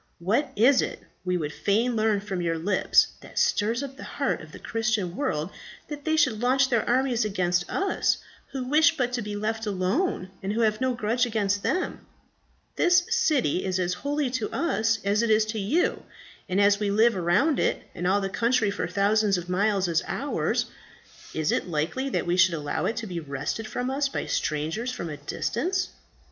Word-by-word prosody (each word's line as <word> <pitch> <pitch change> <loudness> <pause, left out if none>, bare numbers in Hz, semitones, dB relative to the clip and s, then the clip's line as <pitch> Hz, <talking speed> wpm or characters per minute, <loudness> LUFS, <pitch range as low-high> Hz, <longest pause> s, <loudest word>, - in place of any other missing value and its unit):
What 215 - 0
is 255 +5 +5
it, - - -4 0.2
we 180 -1 0
would 150 -3 -3
fain 230 +4 +1
learn 215 -2 +2
from 195 -3 -4
your 165 -1 0
lips, 185 +4 +3
that - - -14
stirs 230 +5 +1
up 270 -1 -7
the - - -9
heart - - -2
of - - -12
the - - -10
Christian 220 -6 -1
world 185 - -2 0.4
that 290 -1 -7
they 315 - +2
should 255 -8 +3
launch 260 +2 +3
their 235 -3 +2
armies 250 -1 +2
against 180 -4 0
us, 390 0 +1 0.3
who 270 -2 -3
wish 305 +5 +4
but 250 -2 0
to 245 - -1
be 210 -1 -5
left 220 +1 -2
alone, 190 - -1
and 195 +2 -2
who 230 - 0
have 215 +1 +1
no 260 -1 +1
grudge 240 +2 +1
against 205 -3 0
them? 365 - -2 0.7
This 355 0 +4
city 250 - +2
is 185 -1 -1
as 180 -1 0
holy 285 +6 -1
to 245 -4 -2
us 225 -9 +1
as 200 +2 +2
it 235 - 0
is 215 0 +4
to 220 0 -3
you; 290 - +1 0.5
and 185 +2 +1
as 200 0 +4
we 210 -1 0
live 220 +3 +4
around 185 - +2
it, - - 0
and 175 +1 -3
all 200 +2 +3
the 195 - -1
country 230 +1 +1
for 180 - -3
thousands 200 +2 +2
of 175 0 -6
miles 195 0 +1
is 165 -2 +1
ours, - - -1 0.7
is 155 -1 +1
it - - 0
likely 170 - -1
that - - -1
we 175 +1 0
should 185 -2 +5
allow 145 -2 -2
it 220 - -2
to 230 - -3
be 180 -4 -4
wrested 145 +8 -4
from 250 +3 -3
us 275 +1 0
by - - -3
strangers 160 - -2
from 170 -10 -5
a 150 - -6
distance?" 350 - -2
215 Hz, 200 wpm, -26 LUFS, 185-250 Hz, 0.7 s, is